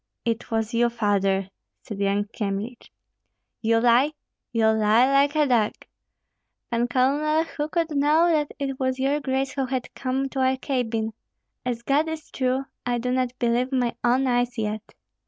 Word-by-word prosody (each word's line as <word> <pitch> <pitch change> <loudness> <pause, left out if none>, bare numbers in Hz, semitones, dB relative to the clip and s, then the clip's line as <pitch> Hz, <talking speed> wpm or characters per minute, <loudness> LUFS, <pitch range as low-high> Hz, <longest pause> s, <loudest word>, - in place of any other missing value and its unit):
"It 230 0 -2
was 225 0 -1
you, 235 +1 +3
father," 195 -4 0 0.3
said 210 -3 -7
young 200 +1 +1
Kyemlich. 210 +3 -4 0.7
"You 225 0 +3
lie, 245 +6 +4 0.4
you 230 -2 +2
lie 220 +2 +4
like 280 +2 +3
a 305 -1 +4
dog! 235 -5 +2 1.0
Pan 235 +1 +1
Colonel, 290 +5 +2
who 300 -2 -4
could 330 -1 -1
know 300 +4 +4
that 305 -3 +1
it 270 -2 -3
was 260 -1 0
your 275 +3 +1
grace 270 -1 -1
who 270 -2 -2
had 255 -1 -3
come 265 +1 -2
to 270 - -4
our 260 0 +2
cabin? 225 -5 -2 0.5
As 240 -2 -3
God 285 +5 +2
is 320 0 -7
true, 260 +1 0 0.2
I 245 0 0
do 250 +1 -2
not 255 -1 -1
believe 245 +2 +1
my 245 -3 0
own 250 +2 +3
eyes 245 -1 0
yet." 215 -1 -4
250 Hz, 165 wpm, -24 LUFS, 230-275 Hz, 1.0 s, lie